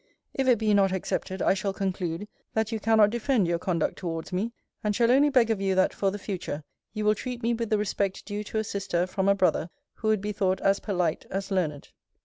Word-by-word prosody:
If 265 -1 0
it 250 - +5
be 215 -1 +2
not 195 -2 +4
accepted, 190 0 -2
I - - +4
shall 195 0 -2
conclude, 185 -1 -3 0.3
that 220 0 +1
you 225 - -2
cannot 215 -1 +4
defend 235 -4 +1
your 170 0 0
conduct 175 -2 -1
towards 165 0 -4
me; 205 +6 -1 0.3
and 210 -1 0
shall 235 +1 +4
only 280 +3 +5
beg 245 -5 +4
of 210 -3 -1
you, 195 -1 +1
that, 185 - +3
for 195 - +1
the 200 - -4
future, 180 -7 -5 0.3
you 215 -1 -3
will 210 - +5
treat 245 +2 -6
me 235 +1 +2
with 230 -1 -2
the 215 - +3
respect 200 -2 -1
due 205 0 -4
to 220 - -4
a 220 - +1
sister 195 -4 -1
from 190 +1 0
a 200 - +5
brother 185 -3 +1 0.2
who 220 - -5
would 215 -1 +3
be 210 +1 -2
thought 190 -2 0
as 195 0 +3
polite 180 -6 -1
as 195 +1 -4
learned. 155 -7 -1
200 Hz, 235 wpm, -27 LUFS, 185-220 Hz, 0.3 s, it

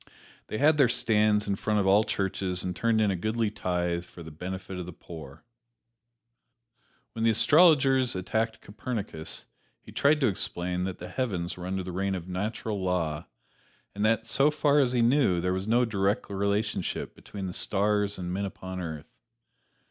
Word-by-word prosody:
They 110 - -4
had 150 +3 +4
their 130 -4 +6
stands 105 -2 +3
in 100 -1 0
front 105 0 0
of 100 - +1
all 100 +3 +5
churches 95 -3 -2
and 90 -1 -3
turned 115 +1 +1
in 105 -2 +3
a - - 0
goodly 110 +4 -1
tithe 90 -3 -1
"for 85 -1 -12
the 80 - -9
benefit 95 +3 -6
of 90 - -6
the - - -6
poor." 80 -5 -11 1.7
When 115 - -3
the 115 - +5
astrologers 135 - +5
attacked 110 +4 -2
Copernicus 100 -7 -5 0.3
he - - -14
tried 150 +2 +3
to - - +4
explain 90 -2 -1
that 95 -1 -4
the 90 - -8
heavens 90 -5 -2
were 90 0 -7
under 95 0 -2
the 90 - -6
reign 95 +2 -1
of 90 -1 -6
natural 105 +2 -3
law, 85 -5 -1 0.7
and 105 - -3
that 115 +1 +2
so 140 +5 +3
far 150 -1 +2
as 130 -4 +3
he 120 -2 +3
knew 120 -8 +3
there 90 +1 0
was 95 +2 -3
no 120 +2 +3
direct 100 -2 -1
relationship 100 +2 -1
between 100 -2 -8
the 90 - -4
stars 105 +1 0
and 90 -1 -5
the - - -3
men 100 +2 -1
upon 95 -1 -6
earth. 80 -3 -7
100 Hz, 180 wpm, -28 LUFS, 90-115 Hz, 1.7 s, their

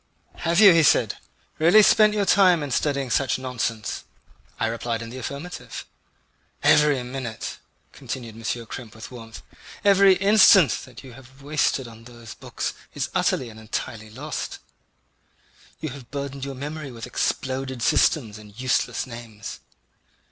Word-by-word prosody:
"Have 170 +2 +1
you," 200 -4 +9
he 165 - +5
said, 150 - +3 0.4
"really 175 +7 +7
spent 215 0 +5
your 205 -1 +1
time 185 -5 +4
in 145 - -5
studying 140 -1 0
such 130 -2 +1
nonsense?" 120 -4 -3 0.6
I - - +1
replied 115 0 -3
in 115 - -8
the 130 - -7
affirmative. 140 +7 -7 0.8
"Every 150 -3 +4
minute," 125 -3 -6 0.3
continued 120 -4 -7
M. 115 - -12 0.2
Krempe 115 -1 -9
with 110 +4 -10
warmth, 115 -2 -10 0.4
"every 195 -1 +6
instant 195 -4 +6
that 125 -1 -13
you 130 -2 -12
have 135 +2 -16
wasted 145 -3 0
on 115 0 -13
those 120 -2 -11
books - - -5 0.2
is - - -3
utterly 125 - 0
and 110 0 -12
entirely 110 0 -5
lost. 145 +8 -5 1.2
You 155 - -4
have 130 -3 -11
burdened 140 -1 -5
your 135 -1 -6
memory 150 +2 -6
with 115 -2 -8
exploded 130 -2 -2
systems 110 -7 +2
and 105 0 -15
useless 130 -2 0
names. 115 -4 -9
130 Hz, 145 wpm, -24 LUFS, 115-150 Hz, 1.2 s, you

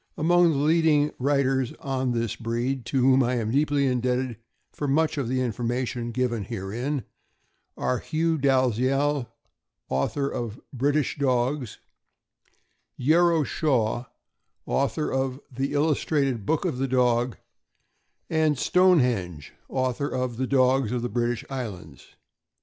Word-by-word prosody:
Among 175 +2 +4
the - - -1
leading 150 0 +3
writers 135 -1 +1
on 130 -2 -2
this 115 -2 -1
breed, 120 +2 -2
to 135 0 +1
whom 130 +1 +5
I 125 0 +1
am 110 -2 -1
deeply 145 +1 +2
indebted 125 -1 0 0.4
for 145 - -3
much 155 +3 +2
of 140 -5 -2
the 130 +1 0
information 120 0 -2
given 120 -3 -1
herein, 120 +10 -3 0.7
are 125 - 0
Hugh 160 0 -1
Dalziel, 135 +1 +1 0.6
author 105 - 0
of 120 -2 -4
"British 145 +2 0
Dogs," 130 -1 0 1.2
Yero 165 +3 +3
Shaw, 125 -6 0 0.6
author 140 +3 0
of 130 0 -1
"The 135 +2 -2
Illustrated 145 -6 0
Book 160 - +1
of 125 - -2
the 135 - 0
Dog," 125 -1 +1 0.9
and 155 -2 +1
Stonehenge, 125 - +2 0.2
author 130 +1 -1
of 125 -2 -3
"The 130 +1 -1
Dogs 130 -3 +3
of 125 -1 -2
the 120 - -2
British 120 +1 -1
Islands." 100 - -7
130 Hz, 125 wpm, -25 LUFS, 120-145 Hz, 1.2 s, whom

